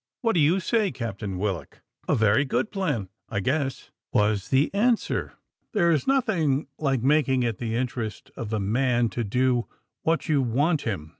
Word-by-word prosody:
What 230 -2 +2
do 170 - +2
you 160 +6 +4
say. 210 +2 +1
Captain 105 -6 -5
Willock?" 95 -3 -3 0.3
"A - - +3
very 110 +3 +4
good 145 +9 -1
plan, 150 - -2 0.2
I 100 - -1
guess," 135 +5 -2 0.2
was 105 -3 +1
the 135 +6 +2
answer; 230 +3 +1 0.4
"there 170 -6 +3
is 155 - +1
nothing 170 - +2
like 135 -5 0
making 135 -2 +3
it 115 -3 -2
the 115 -2 -2
interest 120 -3 -3
of 115 -2 -5
a 110 - 0
man 120 +3 +1
to 120 +4 -3
do 125 +3 +1 0.3
what 165 0 0
you 150 -3 +3
want 145 +6 +1
him. 90 -10 -4
130 Hz, 170 wpm, -25 LUFS, 110-155 Hz, 0.4 s, you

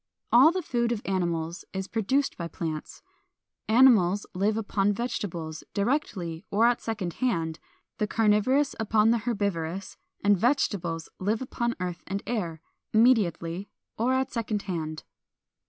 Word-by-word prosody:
All 260 +7 +8
the 370 0 -2
food 235 -4 0
of 230 -2 -2
animals 170 -3 -1
is 190 0 -3
produced 260 +7 0
by 170 - -4
plants. 155 -1 -5 0.7
Animals 220 -5 +5
live 205 +4 +1
upon 205 -2 +1
vegetables, 175 -9 -4
directly 200 - -1
or 215 +3 +3
at 240 0 +3
second 205 -6 -3
hand, 165 -10 0 0.4
the 210 - +1
carnivorous 225 +7 +2
upon 220 0 +3
the 235 - +2
herbivorous; 195 -5 -2 0.3
and 205 0 +5
vegetables 190 - 0
live 210 +4 0
upon 240 -2 -2
earth 180 -1 -4
and 195 +1 -3
air, 170 -9 -3 0.3
immediately 200 -6 +2 0.3
or 245 +4 +1
at 260 0 0
second 220 -4 -2
hand. 155 -4 -4
205 Hz, 135 wpm, -27 LUFS, 175-235 Hz, 0.7 s, All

